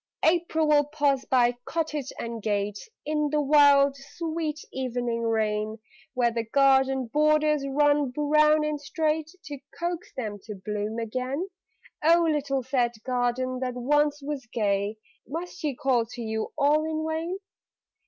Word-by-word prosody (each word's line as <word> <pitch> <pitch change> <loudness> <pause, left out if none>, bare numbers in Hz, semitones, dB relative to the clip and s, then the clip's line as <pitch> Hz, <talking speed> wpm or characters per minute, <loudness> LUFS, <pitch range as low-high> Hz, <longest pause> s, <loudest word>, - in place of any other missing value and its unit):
April 320 -1 +2
will 290 -1 +5
pause 285 -3 0
by 245 -1 +3
cottage 305 -4 -2
and 230 -1 -5
gate 205 - -2 0.2
In 300 0 0
the 300 +1 +1
wild, 285 -1 +5
sweet 315 +2 -4
evening 245 -2 -2
rain, 215 -1 0 0.4
Where 240 -1 +2
the 230 0 -2
garden 265 +1 +3
borders 300 +2 +2
run 290 0 +2
brown 300 +3 +3
and 300 -1 -2
straight, 310 +1 -1 0.2
To 285 -1 -7 0.2
coax 345 0 -3
them 215 -5 -4
to 210 - -6
bloom 210 +3 -4
again. 255 - -3 0.6
(Oh, 335 +2 +5
little 280 -4 0
sad 245 -2 0
garden 255 0 -1
that 250 -1 -3
once 295 +3 +1
was 280 -4 -5
gay, 205 -1 0 0.3
Must 335 +7 -5
she 295 -5 -2
call 245 -3 +1
to 245 0 -8
you 220 0 -3
all 300 +2 +3
in 315 0 -2
vain?) 325 +4 -2
275 Hz, 145 wpm, -26 LUFS, 240-300 Hz, 0.6 s, will